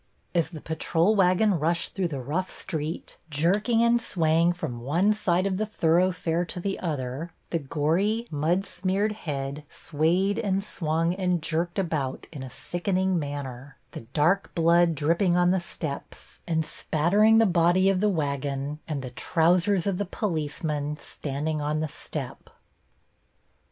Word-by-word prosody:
As 170 -3 +1
the 160 -4 -9
patrol 165 +5 +1
wagon 185 0 +3
rushed 170 +3 0
through 190 -3 0
the 145 -5 -4
rough 170 +8 -2
street, 160 -3 -4
jerking 200 +10 +2
and 235 0 +4
swaying 165 -3 +2
from 155 -9 -5
one 170 - +2
side 185 -3 +1
of 190 -1 0
the 215 - 0
thoroughfare 175 -2 +1
to 180 - -6
the 195 +2 -2
other, 145 -1 -3 0.2
the 165 - +1
gory, 165 - 0
mud 165 +6 +1
smeared 190 +4 0
head 145 -7 -4
swayed 175 +6 0
and 195 -2 0
swung 165 -2 0
and 180 -2 0
jerked 170 +3 -1
about 155 -8 -2
in 145 -5 -8
a 130 - -6
sickening 185 - -1
manner, 140 -2 -6
the - - -7
dark 170 +8 +2
blood 170 0 +4
dripping 170 +5 +2
on 175 0 +4
the 190 - +2
steps 155 -4 -7
and 160 -2 +1
spattering 205 +12 +3
the 225 - +6
body 175 0 +3
of 195 -1 +3
the 210 +2 +3
wagon 140 -3 -2
and 145 -4 -3
the 125 - -6
trousers 175 - +2
of 195 -2 0
the 205 - 0
policemen 150 -5 -2
standing 150 +1 -3
on 150 +1 -1
the 155 - -1
step. 140 - -7
170 Hz, 150 wpm, -26 LUFS, 150-190 Hz, 0.2 s, the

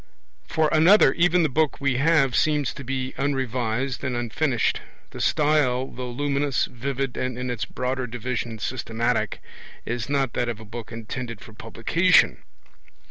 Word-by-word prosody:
For 160 -1 +2
another, 165 -1 +6
even 175 +1 +3
the - - +3
book 155 +2 0
we 140 -3 +1
have 140 -3 +3
seems 150 -4 +1
to 140 - -8
be 130 0 -3
unrevised 130 -2 -1
and 130 -3 -1
unfinished. 120 +2 0 0.3
The - - -7
style, 145 -5 +2
though 125 -1 -6
luminous, 140 +2 0
vivid, 135 +1 -4
and 130 -1 -2
in 125 0 -3
its 120 -2 -3
broader 130 0 -3
division 120 -1 -4
systematic, 115 +1 -2 0.4
is 120 +2 -3
not 135 -3 0
that 120 -1 -1
of 115 -2 -4
a 110 - -11
book 115 +1 -8
intended 115 0 -6
for 110 - -13
publication. 140 +12 +2
130 Hz, 150 wpm, -24 LUFS, 120-145 Hz, 0.4 s, another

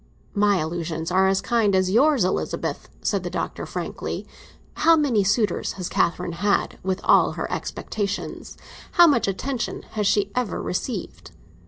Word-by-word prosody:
"My 205 -1 +3
allusions 165 0 -3
are 190 +1 +4
as 195 0 +2
kind 205 -1 +2
as 185 0 +2
yours, 270 +1 +4
Elizabeth," 185 - -2
said - - 0
the - - -4
Doctor - - -4
frankly. - - -5 0.5
"How 330 +1 +6
many 270 -10 +2
suitors 205 +2 +1
has 180 -2 -5
Catherine 175 +1 0
had, 205 0 +1
with 190 0 -2
all - - +4
her - - -3
expectations—how 210 - -1
much 280 -10 +3
attention 240 +6 -3
has 210 -2 0
she 200 0 +2
ever 250 -5 -1
received? 195 +2 -4
200 Hz, 145 wpm, -24 LUFS, 185-235 Hz, 0.5 s, How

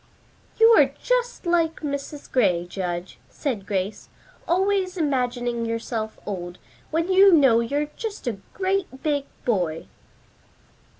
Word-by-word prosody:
"You 450 0 +8
are - - +4
just - - 0
like 335 -2 +1
Mrs. 285 0 -5
Gray, 185 -9 +2
Judge," 175 -1 -5
said 235 -10 -4
Grace, 195 +1 -3 0.4
"always 375 +1 +1
imagining 245 -6 0
yourself 230 -1 -3
old, 180 -3 -5 0.3
when 330 +4 0
you 390 +1 +7
know 270 -9 +6
you're 280 +6 0
just 440 -8 -5
a 235 -5 -2 0.2
great 375 -8 -1
big 290 -2 0 0.2
boy." 175 -9 0
270 Hz, 120 wpm, -24 LUFS, 215-345 Hz, 0.4 s, You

